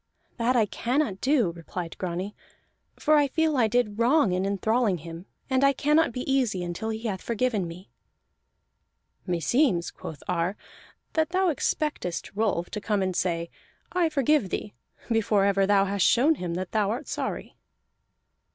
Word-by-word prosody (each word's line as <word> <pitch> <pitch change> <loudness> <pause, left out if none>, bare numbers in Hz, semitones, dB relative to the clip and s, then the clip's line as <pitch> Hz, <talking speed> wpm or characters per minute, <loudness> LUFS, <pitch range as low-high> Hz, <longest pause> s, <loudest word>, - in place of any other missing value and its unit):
"That 245 +1 +1
I 225 -3 +4
cannot 240 -1 -1
do," 255 - +2
replied 170 0 -7
Grani, 185 +3 -3 0.6
"for 305 0 +3
I 290 -1 +4
feel 315 +2 +1
I 240 -4 +3
did 220 -2 0
wrong 240 -2 +4
in 185 +2 0
enthralling 210 +1 +1
him, 165 +3 -9 0.2
and 260 0 +1
I 275 0 +5
cannot 300 +3 +2
be 250 - -4
easy 235 -9 +1
until 175 +6 -4
he 220 0 -4
hath 200 -5 -3
forgiven 230 -5 -1
me." 175 +4 -11 1.4
"Meseems," 180 - +1
quoth 155 - -9
Ar, 180 +2 -1 0.6
"that 315 -1 +1
thou 375 +1 +2
expectest 295 - -2
Rolf 200 -5 -1
to 210 - -4
come 205 -2 0
and 185 -1 -2
say 170 -2 -1 0.4
'I 355 -2 +2
forgive 290 -6 +2
thee,' 205 - -4 0.4
before 215 -3 +3
ever 195 -1 +2
thou 200 -1 +4
hast 200 -1 +2
shown 275 +7 +4
him 180 - -4
that 185 0 -4
thou 210 -2 +1
art 245 +7 -3
sorry." - - -4
210 Hz, 160 wpm, -26 LUFS, 185-260 Hz, 1.4 s, I